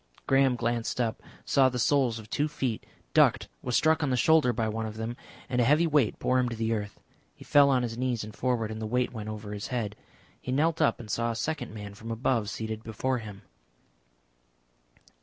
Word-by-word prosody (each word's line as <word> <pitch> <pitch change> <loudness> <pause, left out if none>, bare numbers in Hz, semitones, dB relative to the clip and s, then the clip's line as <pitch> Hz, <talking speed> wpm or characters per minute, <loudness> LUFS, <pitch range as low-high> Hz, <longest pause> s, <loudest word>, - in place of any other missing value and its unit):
Graham 135 -1 +4
glanced 120 0 -2
up, 115 -3 -1 0.2
saw 135 -1 +4
the 125 - -4
soles 125 0 +2
of 110 -1 -10
two 145 +7 0
feet, 135 -7 -3 0.3
ducked, - - +4
was 125 -2 -2
struck 160 0 +3
on 145 - +1
the 125 - +1
shoulder 155 +1 +4
by 115 -1 -1
one 110 +1 -2
of 110 0 -8
them, 115 +2 -4 0.3
and 125 -1 +1
a - - +4
heavy 150 +7 +4
weight 145 -8 +2
bore 130 0 +1
him 125 -1 +1
to 115 - -4
the 115 0 0
earth. 105 -2 -4 0.4
He - - -13
fell 145 -1 +5
on 130 -2 +3
his 115 -1 -4
knees 125 -3 -1
and 105 0 -9
forward, 120 -4 -1
and 110 0 -6
the 110 - -3
weight 125 +2 0
went 110 -2 -6
over 105 -1 -6
his 105 0 -5
head. 115 -5 -3 0.5
He 125 - -4
knelt 160 +4 +1
up 155 - +3
and 115 - -9
saw 115 +2 0
a 115 - -2
second 155 +3 -3
man 105 -2 -8
from 110 +3 -10
above 115 -1 0
seated 110 0 -4
before 120 +4 -2
him. 105 -3 -10
120 Hz, 215 wpm, -28 LUFS, 110-130 Hz, 0.5 s, fell